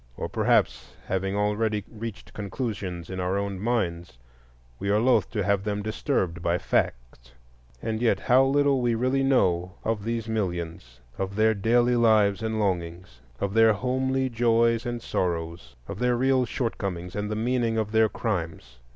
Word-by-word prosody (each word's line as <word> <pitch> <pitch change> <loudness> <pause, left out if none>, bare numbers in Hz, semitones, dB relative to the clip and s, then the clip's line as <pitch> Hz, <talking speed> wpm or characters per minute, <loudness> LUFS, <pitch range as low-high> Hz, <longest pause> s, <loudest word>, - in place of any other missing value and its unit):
Or - - -3
perhaps, - - +1
having 95 +1 -2
already 105 0 0
reached 115 0 -8
conclusions 100 -5 -4
in 95 - -4
our 90 +2 0
own 100 -1 -3
minds, 90 - -2 0.6
we 100 - -2
are 105 - +3
loth 125 +3 +3
to 105 -4 -2
have 100 0 +1
them 105 0 -2
disturbed 100 - -1
by 85 +1 +1
facts. - - -2 0.5
And 110 0 -2
yet 110 -5 +2
how 130 +2 +5
little 140 -1 +2
we 120 -1 +1
really 130 +4 +1
know 90 -10 +2
of 110 -2 -1
these 115 0 -3
millions,—of 85 - -4
their 110 +1 +4
daily 120 +4 +2
lives 110 -3 +3
and 110 -1 -2
longings, 85 - -3 0.2
of 100 -1 -2
their 115 0 +6
homely 130 +3 0
joys 115 0 +2
and 120 -1 -4
sorrows, 80 -7 -3
of - - -6
their 125 0 +2
real 130 0 +2
shortcomings 95 -8 -3
and 105 0 -2
the 105 - -2
meaning 115 0 0
of 110 -1 -1
their 110 0 +4
crimes! 80 - -4
105 Hz, 160 wpm, -26 LUFS, 90-115 Hz, 0.6 s, their